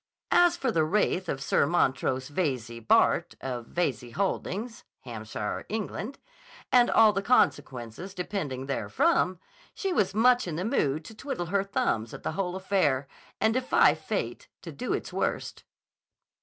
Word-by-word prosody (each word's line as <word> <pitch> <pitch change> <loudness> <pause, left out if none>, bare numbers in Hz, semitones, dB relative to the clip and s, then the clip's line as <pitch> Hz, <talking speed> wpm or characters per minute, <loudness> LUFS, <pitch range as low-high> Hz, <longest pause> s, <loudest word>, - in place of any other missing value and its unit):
As 350 -1 +5
for 265 -7 0
the 160 -6 +2
wraith 185 +1 +1
of 135 0 -2
Sir 140 - +2
Montrose 130 -5 +1
Veyze, 130 -8 -2
Bart., 110 - +3
of 125 -3 -5
Veyze 125 -9 -2
Holdings, 200 +3 -2 0.2
Hampshire, 110 -3 -5
England, 220 +4 -4 0.5
and 245 -1 +5
all 220 -2 +6
the 195 - 0
consequences 145 - 0
depending 165 -9 -3
therefrom, 185 - +1 0.4
she 385 -2 -2
was 200 - +1
much 245 0 +4
in 165 - -3
the 180 +4 -2
mood 155 - 0
to 220 - -10
twiddle 220 -6 -4
her 200 -1 +3
thumbs 115 - -1
at - - -11
the - - -1
whole 185 -2 -2
affair 185 -9 +1 0.3
and 220 +1 +3
defy 255 +1 +4
fate - - -4 0.2
to - - -7
do - - -4
its - - -3
worst. - - -2
180 Hz, 150 wpm, -28 LUFS, 135-220 Hz, 0.5 s, all